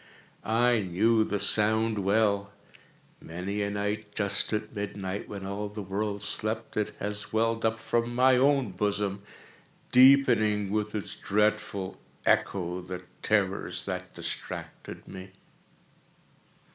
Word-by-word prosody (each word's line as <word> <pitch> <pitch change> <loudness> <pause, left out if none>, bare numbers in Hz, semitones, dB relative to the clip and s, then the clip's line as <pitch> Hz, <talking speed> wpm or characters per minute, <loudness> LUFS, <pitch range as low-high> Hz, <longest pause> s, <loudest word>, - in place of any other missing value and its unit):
I 120 +1 +3
knew 110 +5 +2
the 105 -1 -2
sound 110 +1 +3
well. 100 0 +1 0.7
Many 90 +5 -4
a 100 - 0
night, 105 +1 -3
just 100 -1 +1
at 105 0 -3
midnight, 100 -1 -4
when 100 -2 -6
all 100 +1 -4
the 105 0 -6
world 100 +2 -2
slept, 110 +2 -1
it 105 0 -1
has 105 0 -3
welled 115 +1 +1
up 110 0 +1
from 120 +1 -1
my 130 +1 +5
own 135 -3 +3
bosom, 100 +1 -1 0.7
deepening, 120 -6 +5
with 105 0 -1
its 105 - -4
dreadful 105 -2 -1 0.3
echo, 90 -1 +1
the 90 0 -7 0.2
terrors 100 -3 0
that 90 -1 -5
distracted - - -6
me. 95 0 -10
105 Hz, 120 wpm, -28 LUFS, 100-110 Hz, 0.7 s, my